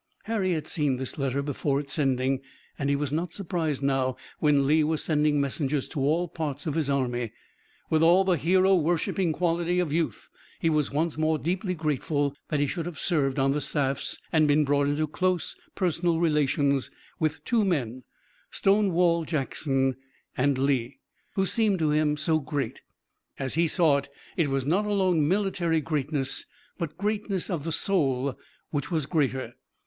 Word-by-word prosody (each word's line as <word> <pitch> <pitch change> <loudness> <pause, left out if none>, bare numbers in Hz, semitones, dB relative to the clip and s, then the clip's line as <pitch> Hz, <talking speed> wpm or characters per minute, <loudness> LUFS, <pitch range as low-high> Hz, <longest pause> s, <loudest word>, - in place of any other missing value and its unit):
Harry 205 -5 0
had 155 -2 -2
seen 145 -5 0
this 130 +3 -4
letter 135 0 0
before 140 0 -1
its 145 -1 -4
sending, 135 -2 +1 0.4
and 140 -1 0
he 140 - +3
was 145 0 -2
not 165 +2 -1
surprised 165 -7 -2
now 135 -2 +1 0.2
when 145 -3 +3
Lee 155 +2 +4
was 155 0 0
sending 150 -2 +2
messengers 140 0 -1
to - - -4
all 155 +6 +1
parts 150 -4 -4
of 155 - -1
his 155 -2 -1
army. 125 -4 -1 0.6
With 160 -1 +3
all 175 +4 +6
the 190 -2 +2
hero 185 +5 +3
worshiping 175 +1 +1
quality 170 +1 0
of 165 -5 0
youth 165 0 -1 0.3
he 165 - +2
was 150 -2 +1
once 155 +2 -1
more 155 0 +2
deeply 180 +4 -2
grateful 145 -2 -1
that 150 - 0
he 145 - +3
should 165 +4 -3
have 175 - -7
served 145 -6 0
on 135 0 +3
the 150 +1 0
staffs 140 -2 -1
and 155 -2 +4
been 150 +1 +4
brought 140 0 +2
into 145 +2 +1
close 180 +3 -1 0.2
personal 170 -2 +1
relations 145 -4 +1 0.3
with 155 -2 -1
two 235 -3 +2
men, 130 - -1 0.5
Stonewall 180 -4 +2
Jackson 135 -3 -1 0.4
and 135 +1 +2
Lee, 130 -2 0 0.4
who 190 - +2
seemed 205 +1 +2
to 155 -3 +1
him 150 0 +2
so 155 +1 +2
great. 140 -4 -3 0.6
As 135 -1 -3
he 165 +2 +2
saw 155 -3 +3
it, 140 - -5 0.3
it 165 -5 +1
was 135 -1 -1
not 190 +8 +1
alone 185 -7 +2
military 180 -3 +1
greatness 145 -2 -1 0.4
but 160 -2 -4
greatness 205 -2 -2
of 165 -4 -3
the 165 - -2
soul, 140 -8 +1 0.4
which 145 -2 -2
was 160 -5 0
greater. 135 -6 -1
155 Hz, 170 wpm, -27 LUFS, 140-170 Hz, 0.6 s, all